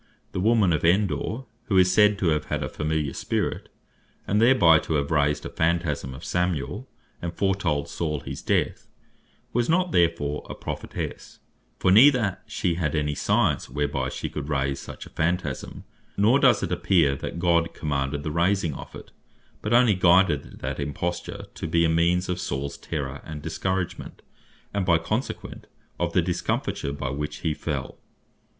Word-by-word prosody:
The - - -3
woman 105 -3 +3
of 75 - -1
Endor, 100 +7 +1 0.2
who 100 -5 +1
is 90 0 +5
said 105 -1 +5
to 90 - +1
have 75 -2 0
had - - -2
a - - -3
familiar 75 -2 -2
spirit, - - -2 0.6
and 105 +2 +1
thereby 100 -11 +6
to 80 - -2
have 70 0 -1
raised 75 -1 +1
a - - -4
Phantasme 80 -5 -1
of 70 - -10
Samuel, 90 - -2 0.3
and 85 - -3
foretold 95 -7 0
Saul 75 -4 -3
his - - -7
death, - - 0 0.7
was 120 0 +1
not 180 +1 +2
therefore 85 - +1
a - - -5
Prophetesse; - - -6 0.4
for 90 - +2
neither 125 +6 +7
had 100 -5 -1
she 85 - -1
any 75 -3 0
science, - - +1
whereby 70 -2 -1
she - - -4
could 75 0 -6
raise 70 -2 0
such - - -9
a - - -12
Phantasme; 80 -4 -2 0.3
nor 110 +7 +4
does 125 -6 +4
it - - -2
appear 80 -8 +3
that - - -5
God 85 -1 +2
commanded 70 -1 -2
the 75 - -3
raising 85 0 +1
of - - -9
it; - - -11 0.5
but 105 - -3
onely 120 -2 +5
guided 90 -5 +3
that - - -3
Imposture 75 +5 -4
to - - -5
be 85 +1 +3
a - - +2
means 85 +2 +2
of 90 -1 -2
Sauls 70 -2 -3
terror 70 -3 -5
and 75 -2 -8
discouragement; 95 -1 -3 0.5
and 100 -1 0
by 85 -2 +4
consequent, 110 +10 -4 0.3
of 85 -1 -1
the 90 - +3
discomfiture, 85 -4 -2
by 70 -2 -4
which 75 +1 -4
he 80 - 0
fell. 70 -4 -4
85 Hz, 170 wpm, -25 LUFS, 75-95 Hz, 0.7 s, neither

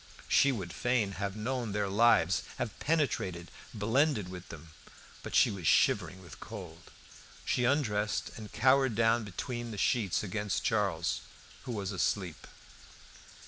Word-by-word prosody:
She 140 - +4
would 95 -9 -5
fain 120 -5 +1
have 100 0 -4
known 115 0 -3
their 105 -1 0
lives, 95 - +4 0.2
have 120 -4 -4
penetrated, 95 - -1 0.2
blended 115 - +1
with 90 -1 -9
them. 80 0 -11 0.5
But - - -6
she - - +5
was 95 -6 -4
shivering 95 +6 +2
with 85 - -12
cold. 90 -6 -9 0.6
She 125 - +1
undressed, 110 -6 0
and 110 -2 -9
cowered 130 -2 +3
down 115 +1 +3
between 120 +4 -5
the 110 - -6
sheets 105 -5 +1
against 105 +1 -2
Charles, 95 -6 0 0.4
who - - -4
was 100 -2 -3
asleep. 95 -3 -2
105 Hz, 140 wpm, -31 LUFS, 95-120 Hz, 0.6 s, she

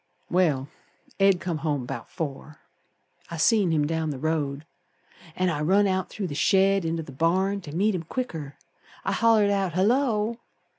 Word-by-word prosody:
Well, 155 -7 +2 0.5
Ed 195 -2 +4
come 170 -4 -3
home 145 -4 -1
'bout 120 -2 -6
four. 150 -1 -6 0.7
I 170 - -5
seen 205 +2 +3
him 155 -2 +2
down 160 0 -1
the 145 - -4
road, 150 -1 -2 0.7
An' 185 0 +1
I 150 -2 -2
run 195 +6 +3
out 190 -1 0
through 205 - -4
the 160 - -4
shed 195 +3 +3
inter 165 0 -2
th' 140 -3 -11
barn 190 +6 +1
To 150 - -9
meet 205 +4 +2
him 180 - -2
quicker. 160 - -5 0.5
I - - 0
hollered 220 -3 +4
out, 195 -4 0
'Hullo!' 225 +3 +1
175 Hz, 165 wpm, -26 LUFS, 155-195 Hz, 0.7 s, Ed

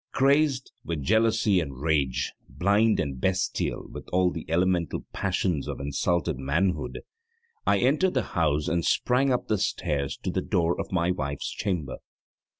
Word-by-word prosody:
Crazed 140 -1 +2
with 80 -4 -3
jealousy 110 0 +3
and 70 -6 -5
rage, 70 -4 0 0.2
blind 100 - +2
and 70 -6 -3
bestial 95 0 -1
with - - -10
all 90 0 +3
the 80 - -7
elemental 85 0 +1
passions 90 -5 -1
of - - -4
insulted 70 +2 -1
manhood, 80 +5 -1 0.7
I - - +4
entered 150 +8 +2
the 130 - +2
house 75 -3 +1
and 85 0 0
sprang 130 +8 +2
up 125 - 0
the 105 -2 +1
stairs 75 -9 -1
to - - -1
the - - -1
door 85 0 0
of 95 - -8
my 90 -1 +1
wife's 70 -5 -3
chamber. 80 -10 -3
90 Hz, 150 wpm, -26 LUFS, 75-105 Hz, 0.7 s, I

